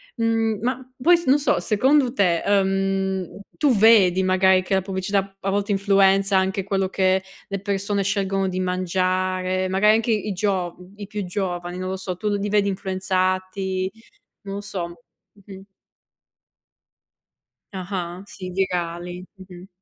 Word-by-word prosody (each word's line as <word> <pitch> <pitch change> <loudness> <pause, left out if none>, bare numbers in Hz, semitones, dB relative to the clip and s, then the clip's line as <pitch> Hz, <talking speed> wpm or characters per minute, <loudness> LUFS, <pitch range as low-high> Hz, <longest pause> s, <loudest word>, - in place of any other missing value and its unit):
Mhmm, 225 -2 0
ma 255 +2 -3
poi 345 +5 +6
s 340 - -7
non 275 +2 +4
so, 290 - +1
secondo 260 +4 +3
te, 180 -8 +2
ehm, 195 -1 0 0.2
tu 290 -4 +3
vedi, 200 -4 +5
magari, 185 0 +4
che 195 - -3
la 190 - +2
pubblicità 195 +1 -2
a 195 - -2
volte 200 +1 -1
influenza 195 0 +3
anche 190 +1 0
quello 195 -1 -1
che 190 0 +1 0.2
le 200 -1 -4
persone 200 0 -1
scelgono 195 -1 0
di 185 0 -3
mangiare, 185 0 0
magari, 210 +3 +4
anche 225 +1 0
i 210 -1 -1
giov 180 -2 -2
i 205 -1 -7
più 210 0 -4
giovani, 180 -1 -3
non 185 0 -4
lo 190 - -3
so. 185 -1 -4
Tu 210 - -2
li 205 +1 -2
vedi 205 -1 +2
influenzati? 185 0 -1 0.5
Non 195 0 -6
lo 200 - -4
so. 195 -4 -4 0.6
Mh-mh. 195 -1 -11 2.1
Ah-ah, 185 -1 -5
sì, 185 -2 -8
virali, 175 -1 -3
mh-mh. 185 -1 -12
195 Hz, 145 wpm, -23 LUFS, 185-205 Hz, 2.1 s, poi